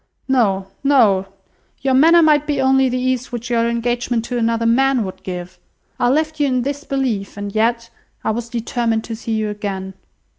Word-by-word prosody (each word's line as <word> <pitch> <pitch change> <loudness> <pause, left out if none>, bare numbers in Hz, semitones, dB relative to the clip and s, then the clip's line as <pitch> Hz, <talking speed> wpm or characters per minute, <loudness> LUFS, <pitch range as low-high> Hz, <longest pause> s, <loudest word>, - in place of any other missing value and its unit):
"No, 210 -8 +2 0.2
no! 220 -9 +4 0.5
your 265 0 +1
manner 330 +6 +6
might 300 -1 +3
be 290 -2 0
only 265 0 +3
the 250 - -1
ease 255 0 -1
which 240 0 -5
your 230 0 +2
engagement 235 0 -1
to 245 0 -3
another 230 0 0
man 260 +1 +3
would 185 - -8
give. 180 0 -7 0.4
I 245 - +3
left 310 +3 0
you 290 - +3
in 255 -2 0
this 285 +2 -4
belief; 245 -10 -2
and 205 0 -5
yet, 230 +1 0 0.3
I - - +1
was 235 +1 -4
determined 230 -1 -1
to 225 - -5
see 225 0 -4
you 215 -1 -1
again. 195 -2 -5
235 Hz, 185 wpm, -19 LUFS, 220-265 Hz, 0.5 s, manner